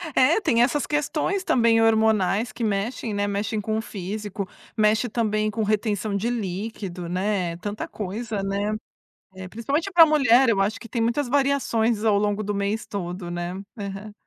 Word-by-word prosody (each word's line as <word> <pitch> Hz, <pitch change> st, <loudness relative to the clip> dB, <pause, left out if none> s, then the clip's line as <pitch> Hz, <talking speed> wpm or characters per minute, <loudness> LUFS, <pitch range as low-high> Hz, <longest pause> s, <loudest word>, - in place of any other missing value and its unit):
É, 295 Hz, +11 st, +4 dB
tem 235 Hz, -, +3 dB
essas 280 Hz, +3 st, +1 dB
questões 305 Hz, +6 st, -1 dB
também 230 Hz, -5 st, +3 dB
hormonais, 220 Hz, -1 st, +2 dB
que 235 Hz, -, -6 dB
mexem, 215 Hz, +2 st, -1 dB
né, 205 Hz, 0 st, 0 dB
mexem 210 Hz, +2 st, -2 dB
com 215 Hz, +1 st, -1 dB
o 220 Hz, -, -1 dB
físico, 200 Hz, -1 st, -5 dB, 0.3 s
mexe 215 Hz, +2 st, +3 dB
também 215 Hz, -2 st, 0 dB
com 220 Hz, +1 st, -1 dB
retenção 210 Hz, -1 st, 0 dB
de 210 Hz, +4 st, 0 dB
líquido, 195 Hz, -4 st, -4 dB
né, 185 Hz, -2 st, -1 dB
tanta 205 Hz, +3 st, -5 dB
coisa, 215 Hz, +1 st, -4 dB
né. 200 Hz, +2 st, -1 dB, 0.6 s
Eh, 185 Hz, -1 st, -7 dB
principalmente 280 Hz, -, -2 dB
pra 340 Hz, -2 st, +9 dB
mulher 270 Hz, -5 st, +4 dB
eu 200 Hz, -4 st, +3 dB
acho 205 Hz, +3 st, 0 dB
que 230 Hz, -, -10 dB
tem 230 Hz, -, -2 dB
muitas 240 Hz, +4 st, 0 dB
variações 240 Hz, -5 st, +1 dB
ao 210 Hz, -2 st, +4 dB
longo 205 Hz, 0 st, 0 dB
do 205 Hz, 0 st, -2 dB
mês 200 Hz, +2 st, -2 dB
todo, 180 Hz, -2 st, -5 dB
né. 175 Hz, +1 st, -4 dB, 0.2 s
Aham. 200 Hz, +1 st, -6 dB
215 Hz, 170 wpm, -24 LUFS, 200-235 Hz, 0.6 s, pra